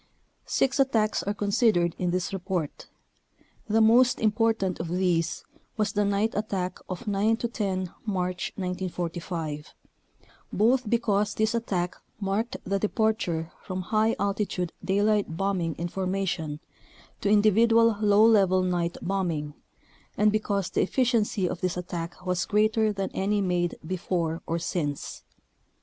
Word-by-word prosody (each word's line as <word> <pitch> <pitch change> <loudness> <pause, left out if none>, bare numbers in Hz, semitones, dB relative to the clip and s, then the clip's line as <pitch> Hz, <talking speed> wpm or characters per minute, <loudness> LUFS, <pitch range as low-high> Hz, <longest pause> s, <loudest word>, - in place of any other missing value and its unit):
Six 270 +2 +1
attacks 225 -6 +2
are 200 - -2
considered 200 -4 +2
in 180 - 0
this 185 +2 -1
report. 180 -5 -3 0.8
The 220 +1 +3
most 240 +3 +5
important 220 -3 +1
of 170 - -3
these 175 -2 0 0.3
was 210 -1 0
the 210 - +2
night 205 +2 +1
attack 195 -4 -2
of 185 +6 -5
9 210 +2 +2
10 195 -6 -2
March 180 -3 -2
1945, 175 -4 -4 0.8
both 240 +3 +2
because 210 -3 +1
this 220 +1 +1
attack 185 -7 -1 0.2
marked 215 +5 -1
the 195 +1 -1
departure 210 -6 0
from 185 -1 -4
high 220 +1 +3
altitude 200 -3 -1
daylight 200 -2 +1
bombing 185 -4 -1
in 170 - -3
formation 185 -5 -2 0.6
to 200 - +1
individual 225 +2 +5
low 210 +1 +5
level 195 -4 +4
night 175 -2 -1
bombing, 170 -6 -1 0.6
and 210 0 +4
because 200 -3 -1
the - - +1
effi 255 +7 +1
ciency 220 -6 +1
of 175 - -5
this 185 -1 -1
attack 175 -1 -6
was 180 0 0
greater 215 +1 +2
than 195 -2 -3
any 205 +2 0
made 180 -3 0
before 170 -2 -2
or 165 - 0
since. 155 -4 -3
195 Hz, 130 wpm, -27 LUFS, 180-215 Hz, 0.8 s, most